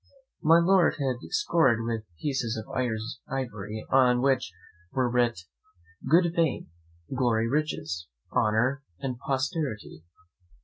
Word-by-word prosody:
My 165 +1 +6
Lord 180 +1 +4
had 135 -4 -1
scored 160 - +2
with 115 -2 -3
pieces 125 -6 -1
of 110 - -6 0.6
ivory, 110 -6 -4
on 125 -1 +4
which 130 -7 +2 0.4
were 130 -2 +1
writ, 120 -5 +1 0.7
"Good 170 +2 +4
Fame, 160 - 0 0.4
Glory, 115 -3 +2
Riches, 85 - -2 0.3
Honour, 120 +6 +2 0.2
and 125 +1 -4
Posterity!" 135 - -3
130 Hz, 105 wpm, -27 LUFS, 115-145 Hz, 0.7 s, My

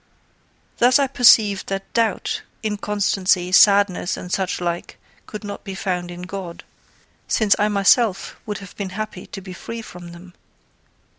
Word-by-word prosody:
Thus 250 +2 +5
I 280 - +2
perceived 225 -6 +4
that 195 0 -5
doubt, 225 -4 0 0.2
inconstancy, 200 -3 0
sadness, 200 -1 +4
and 180 - -8
such 190 -1 -1
like, 175 -1 -4 0.3
could 210 0 -8
not 205 -1 -7
be 195 -2 -7
found 180 -2 -3
in 175 0 -8
God, 180 -2 -7 0.6
since 215 -3 +3
I 210 - +3
myself 205 0 +2
would 210 -1 -3
have 200 - -15
been 200 -2 -4
happy 215 -4 -6
to 195 - -8
be 185 -1 -9
free 230 +5 -7
from 175 -4 -11
them. 175 +1 -13
195 Hz, 150 wpm, -21 LUFS, 180-210 Hz, 0.6 s, Thus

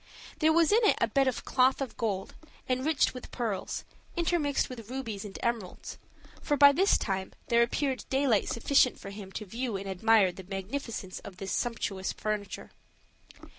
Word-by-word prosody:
There 315 0 +4
was 330 +1 +4
in 435 - +6
it 420 - +4
a - - +3
bed 270 +4 +2
of 255 - -2
cloth 260 0 +3
of 265 -5 -4
gold, 200 -4 -2 0.3
enriched 260 +4 +1
with 255 - -9
pearls, 225 -6 -3 0.3
intermixed 330 -5 +1
with 230 -4 -9
rubies 235 -6 -4
and 205 -2 -8
emeralds: 230 -6 -3 0.4
for 290 - 0
by 285 0 +9
this 380 +8 +4
time 190 -2 -3 0.2
there 235 0 +5
appeared 260 +2 0
daylight 265 -6 +2
sufficient 255 +2 +3
for 195 - -8
him 200 -1 -9
to 215 - -5
view 230 +1 -3
and 195 +1 -7
admire 195 0 +4
the 190 - -10
magnificence 195 +1 -5
of 190 -2 -11
this 195 0 -5
sumptuous 205 -5 -2
furniture. 210 -1 -4
235 Hz, 170 wpm, -29 LUFS, 200-270 Hz, 0.4 s, by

